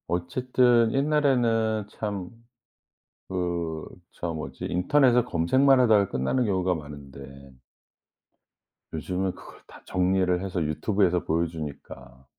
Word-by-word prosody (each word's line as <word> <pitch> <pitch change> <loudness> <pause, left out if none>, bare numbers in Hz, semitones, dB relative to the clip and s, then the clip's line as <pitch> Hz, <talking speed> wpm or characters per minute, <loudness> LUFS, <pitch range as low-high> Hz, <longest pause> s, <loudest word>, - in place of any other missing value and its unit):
어쨌든 120 +6 +2
옛날에는 120 -7 +1
참 100 -4 -5 1.0
그 85 -4 -3 0.3
저 85 -1 -4
뭐지 80 - -6
인터넷에 125 +7 +3
검색만 130 +8 +3
하다가 105 -5 +4
끝나는 65 - 0
경우가 95 -3 +1
많은데 70 -2 -11 1.4
요즘은 90 +4 -2
그걸 - - -14
다 - - -15
정리를 90 0 +1
해서 95 -2 -3
유튜브에서 90 +3 0
보여주니까. 75 -6 -5
90 Hz, 250 characters per minute, -26 LUFS, 80-115 Hz, 1.4 s, 하다가